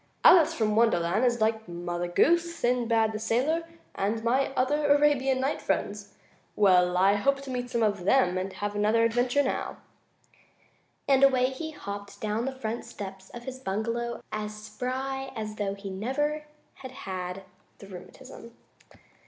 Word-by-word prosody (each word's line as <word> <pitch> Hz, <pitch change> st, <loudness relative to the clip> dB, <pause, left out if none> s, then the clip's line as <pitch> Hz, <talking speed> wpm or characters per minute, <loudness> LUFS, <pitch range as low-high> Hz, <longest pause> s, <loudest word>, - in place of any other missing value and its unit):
"Alice 340 Hz, -4 st, +7 dB
from 215 Hz, -2 st, 0 dB
Wonderland 215 Hz, -2 st, +2 dB
is 240 Hz, -2 st, +1 dB
like 220 Hz, 0 st, 0 dB
Mother 175 Hz, 0 st, -4 dB
Goose, 340 Hz, -, +2 dB
Sinbad 235 Hz, -4 st, +1 dB
the 215 Hz, -, -4 dB
Sailor 265 Hz, +10 st, 0 dB, 0.3 s
and 215 Hz, +3 st, -2 dB
my 255 Hz, +4 st, +2 dB
other 290 Hz, +3 st, +1 dB
Arabian 285 Hz, -2 st, +3 dB
Night 270 Hz, +3 st, -1 dB
friends. -, -, -3 dB, 0.4 s
Well, 180 Hz, -3 st, +4 dB
I 195 Hz, +2 st, +5 dB
hope 275 Hz, +7 st, 0 dB
I -, -, -5 dB
meet 245 Hz, -1 st, -3 dB
some 235 Hz, -2 st, 0 dB
of 205 Hz, -4 st, 0 dB
them 185 Hz, -3 st, +3 dB
and 185 Hz, +1 st, -2 dB
have 205 Hz, 0 st, -4 dB
another 215 Hz, +2 st, +2 dB
adventure 245 Hz, +4 st, +2 dB
now," 265 Hz, -, -3 dB, 1.3 s
and 275 Hz, -1 st, +4 dB
away 260 Hz, -1 st, +4 dB
he 315 Hz, +4 st, -5 dB
hopped 200 Hz, -9 st, -8 dB
down 215 Hz, +2 st, -2 dB
the 270 Hz, -, -1 dB
front 230 Hz, -2 st, -4 dB
steps 195 Hz, -5 st, -9 dB
of 240 Hz, -, -10 dB
his 260 Hz, +1 st, -7 dB
bungalow 235 Hz, +2 st, -3 dB
as 215 Hz, 0 st, -4 dB
spry 265 Hz, +5 st, -4 dB
as 215 Hz, -1 st, -5 dB
though 200 Hz, -1 st, -2 dB
he 200 Hz, -1 st, -7 dB
never 295 Hz, +9 st, -2 dB, 0.3 s
had 260 Hz, -, -8 dB, 0.2 s
had 185 Hz, 0 st, -5 dB, 0.3 s
the -, -, -12 dB
rheumatism. 230 Hz, +5 st, -12 dB
230 Hz, 155 wpm, -27 LUFS, 205-265 Hz, 1.3 s, Alice